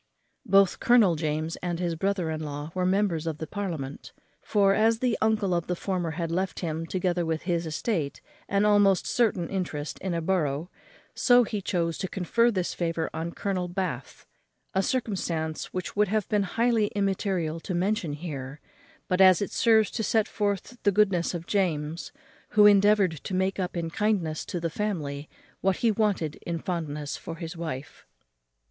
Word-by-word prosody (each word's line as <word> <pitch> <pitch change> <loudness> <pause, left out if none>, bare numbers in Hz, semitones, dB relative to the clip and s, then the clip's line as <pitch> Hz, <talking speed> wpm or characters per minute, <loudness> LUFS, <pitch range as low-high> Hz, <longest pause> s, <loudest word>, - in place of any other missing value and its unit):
Both 195 -1 +4
Colonel 225 -8 +5
James 155 +1 -2
and 175 -1 -3
his 175 -2 -1
brother 180 -1 -1
in 155 - -3
law 145 0 -5
were 185 -1 0
members 185 -4 +1
of 160 -2 -2
parliament; 165 -9 -5 0.3
for, 200 -2 +3
as 225 +2 +3
the 245 -1 +1
uncle 215 -4 +2
of 170 -1 -1
the 180 - -1
former 180 -2 -2
had 165 -2 -2
left 185 +3 -2
him, 165 -1 -3
together 180 -1 0
with 160 -1 -2
his 170 -1 -1
estate, 155 -2 -2 0.3
an 200 +1 +2
almost 205 -2 +4
certain 205 -8 +1
interest 165 -6 -4
in 185 -3 -2
a - - 0
borough, 160 -2 0 0.4
so 245 -1 +5
he 210 -2 -3
chose 170 -4 -1
to 190 - -2
confer 205 +6 +2
this 185 -6 -1
favour 165 -1 -2
on 165 +2 -4
Colonel 185 -3 -2
Bath; 175 -8 -4 0.5
a 190 - +2
circumstance 180 -9 -2
which 185 -1 -5
would 210 0 +3
have 215 0 0
been 210 -1 +2 0.2
highly 230 -2 +3
immaterial 190 -5 0
to 180 +2 -4
mention 185 -3 0
here, 145 -3 -6 0.5
but 185 +1 +2
as 185 -2 +7
it 200 - -3
serves 220 -3 +4
to 230 - -3
set 220 0 +2
forth 205 +3 -2
the 205 - +3
goodness 190 -4 +2
of 170 -1 -5
James, 165 -5 -1 0.5
who 210 - +8
endeavoured 205 -4 +5
to 190 - -3
make 190 +1 0
up 180 -1 -2
in 165 -1 -3
kindness 190 -7 0
to 175 - -4
the 165 -1 -2
family 150 -9 -3 0.3
what 190 0 +2
he 230 +3 +2
wanted 200 -8 0
in 170 -1 -4
fondness 155 -5 -4
for 165 - -7
his 165 +1 -7
wife. 155 -5 -6
180 Hz, 175 wpm, -27 LUFS, 165-205 Hz, 0.5 s, who